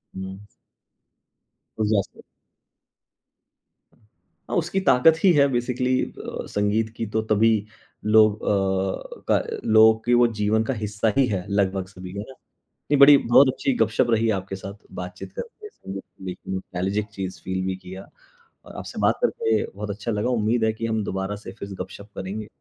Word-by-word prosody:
हुँ। 95 0 -6 1.4
उस 110 -1 +1
जैसे। 100 -3 -1 2.3
हाँ, - - -2
उसकी 175 +3 0
ताकत 160 -2 +5
ही 190 - +7
है 140 -2 +5
बेसीकली 125 +1 0
अ - - -7
संगीत 105 +2 0
की 115 - -2
तो 110 - +3
तभी 110 +2 +5 0.6
लोग 110 -1 +5
अ, 95 -1 -1
का - - +5 0.3
लोगों 110 0 +7
के 120 - +2
वो 120 0 +6
जीवन 105 +2 +2
का 135 - -1
हिस्सा 105 0 -1
ही 135 - +5
है 90 -2 -2
लगभग 95 -2 0
सभी 90 -1 -10
का 100 - -5
ना। 110 +6 -8 0.4
नहीं 145 -1 -2
बड़ी 140 +1 +9
बहुत 130 +3 +5
अच्छी 270 - -1
गप-शप 120 - +1
रही 115 0 +2
आपके 95 +1 -6
साथ 95 +1 -8 0.3
बात-चीत 90 0 -8
करके 465 -3 -8
संगीत 95 - -8 0.2
पे 95 - -3
एक - - -14
नोस्टालजिक 95 +2 -2
चीज़ 95 -2 -5
फील 95 0 -2
भी 95 0 -2
किया 95 +1 -10 0.6
और - - -12
आपसे - - -7
बात - - +3
करके 110 -1 +1
बहुत 105 +1 -6
अच्छा 105 +3 -4
लगा। 105 +3 -1
उम्मीद 115 -1 +1
है 110 - +2
कि 115 +1 -4
हम 110 -1 -1
दोबारा 95 +2 -3
से - - -6
फिर 100 - -6
से 100 - -7
गप-शप 100 +2 -12
करेंगे। 105 +3 -5
105 Hz, 170 wpm, -24 LUFS, 95-115 Hz, 2.3 s, बड़ी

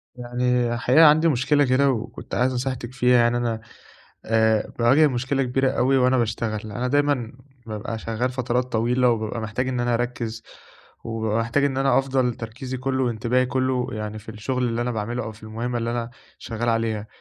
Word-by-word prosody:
يعني 125 0 0
الحقيقة، 130 +7 +5
عندي 155 +2 +6
مشكلة 145 +1 +2
كده 135 +2 +3
وكنت 115 -4 -5
عايز 130 +1 +2
نصيحتِك 125 -1 -3
فيها. 125 0 +4
يعني 120 0 +3
أنا 115 -2 -2 0.6
آآ، 110 -1 +2
باواجه 130 +6 +5
مشكلة 130 +1 0
كبيرة 130 +1 +1
أوي 130 +1 +2
وأنا 130 0 +3
باشتغل. 110 -2 -2
أنا 125 +4 -2
دايمًا 145 -4 +1 0.3
بابقى 110 +1 -5
شغَّال 115 +3 -2
فترات 125 -1 -1
طويلة، 120 +2 +2
وبابقى 110 0 -2
محتاج 115 +4 -2
إن 125 -1 -1
أنا 120 0 +1
أركِّز، 115 -1 -3 0.6
وبابقى 110 -1 -1
محتاج 115 +5 +1
إن 135 -2 0
أنا 135 0 +3
أفضل 130 -2 0
تركيزي 125 +4 -6
كله 130 +1 -1
وانتباهي 120 +2 +1
كله، 130 -1 0
يعني 105 -1 -5
في 110 - -16
الشغل 125 +4 -2
اللي 115 0 -2
أنا 125 - -2
باعمله، 115 +2 -3
أو 110 - -6
في 110 +1 -18
المهمة 115 +3 -3
اللي 115 0 -2
أنا 120 0 -3 0.3
شغَّال 115 0 -4
عليها. 115 -2 0
120 Hz, 180 wpm, -23 LUFS, 115-130 Hz, 0.6 s, عندي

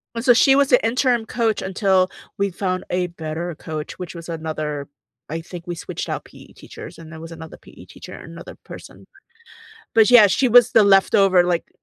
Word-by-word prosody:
And 230 +1 -5
so, 245 - +7
she 270 +3 +4
was 280 -1 +2
the 250 -4 +4
interim 240 -1 +1
coach 225 -2 -1
until 190 -1 +1 0.3
we 200 0 0
found 185 0 -3
a 180 0 -1
better 170 +1 -6
coach, 155 +1 -7
which 180 -1 -8
was 170 -1 -10
another 155 -3 -5 0.4
I 165 - -4
think 175 +1 -11
we 175 - -4
switched 165 - -7
out - - -4
PE - - -17
teachers, - - -12
and 165 -1 -13
there 160 - -10
was 165 +1 -10
another 160 -1 -11
PE - - -16
teacher, - - -13
another - - -11
person. - - -13 0.9
But, 225 0 +4
yeah, 240 -4 +8
she 255 +6 +1
was 245 0 +5
the 210 - +5
leftover, 195 -2 +4
like, 175 -1 -2
185 Hz, 195 wpm, -20 LUFS, 165-225 Hz, 0.9 s, yeah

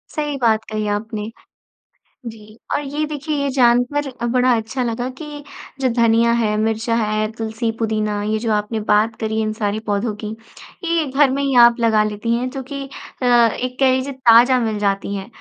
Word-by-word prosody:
सही 295 -2 -2
बात 220 -2 +2
कही 215 -1 -2
आपने। 210 +1 -3 1.0
जी, 215 -1 -11 0.2
और - - +1
ये 290 +2 -3
देखिए, 300 0 -4
ये 280 - 0
जानकर 250 +3 +2
अ, 240 -2 -5
बड़ा 250 +1 +2
अच्छा 225 +4 -3
लगा 240 +1 -2
कि 295 -2 -8 0.4
जो 260 - +2
धनिया 230 0 +3
है, 210 -2 0
मिर्चा 225 +1 0
है, 215 -1 0
तुलसी, 225 0 -3
पुदीना, 215 -2 -1
ये 215 +1 -1
जो 225 0 -1
आपने 210 +1 -1
बात 215 +2 +3
करी 220 -1 -2
है - - +1
इन 215 - -1
सारे 215 -1 -2
पौधों 210 +1 -1
की, 215 +1 -5 0.5
ये 335 -2 +1
घर 275 +1 +3
में 275 +2 -1
ही 275 -1 0
आप 235 0 +4
लगा 220 -2 +3
लेती 215 +2 -2
हैं, 245 +2 -1
जो 270 0 -6
कि 275 -1 -4 0.4
अ, - - 0
एक 245 +1 +2
कह 265 -1 +5
लीजिए, 260 +2 -1
ताज़ा 255 0 +5
मिल 220 -3 -1
जाती 200 0 -1
हैं। 195 -1 -5
230 Hz, 195 wpm, -19 LUFS, 215-260 Hz, 1.0 s, कह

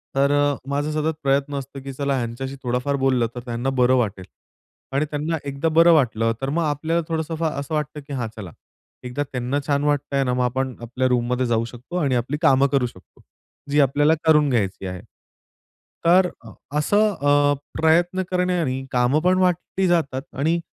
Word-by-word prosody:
तर 140 +1 +3
अ, 145 0 +2
माझा 145 +2 -1
सतत 155 +1 0
प्रयत्न 140 +1 +1
असतो, 135 +1 -9
की 135 - -6
चला 140 +1 -1
ह्यांच्याशी 130 +3 -4
थोडाफार 125 +3 -1
बोललं 130 -3 +2
तर - - -4
त्यांना 120 +2 -2
बरं 125 +1 +5
वाटेल. 100 -6 -2 0.7
आणि 145 +2 +2
त्यांना 155 +2 -1
एकदा 140 +3 -2
बरं 170 +1 +7
वाटलं, 115 -6 +2
तर 135 - -1
मग 165 +4 0
आपल्याला 160 +3 0
थोडंसं 160 0 -2
फा 165 +1 -1
असं 140 +2 -6
वाटतं, 150 0 -3
की 145 - -6
हां, 125 -4 -2
चला 95 -6 -8 0.5
एकदा 125 +4 -2
त्यांना 125 +2 -1
छान 145 -1 +1
वाटतंय 145 -1 0
ना, 125 -1 0
मग 125 0 +1
आपण 130 +1 -1
आपल्या 125 +2 -1
रूममध्ये 125 0 +1
जाऊ 115 -1 +1
शकतो 125 +8 -10
आणि 140 -7 +1
आपली 125 +5 -1
कामं 140 -4 +5
करू 135 -3 +2
शकतो, 90 -6 -17 0.5
जी 145 +1 +2
आपल्याला 145 +3 +3
करून 150 -2 +5
घ्यायची 100 -6 -1
आहे. 90 -1 -6 1.0
तर 180 +2 +5
अ, 115 - -11 0.3
असं 205 +7 +2
अ, 145 0 +4 0.3
प्रयत्न 175 +4 +3
करण्याने, 175 -8 0
काम 125 +4 +2
पण 180 +3 +2
वाटली 185 +1 +1
जातात 155 -7 +1 0.2
आणि 165 +4 +2
140 Hz, 180 wpm, -22 LUFS, 125-155 Hz, 1.0 s, बरं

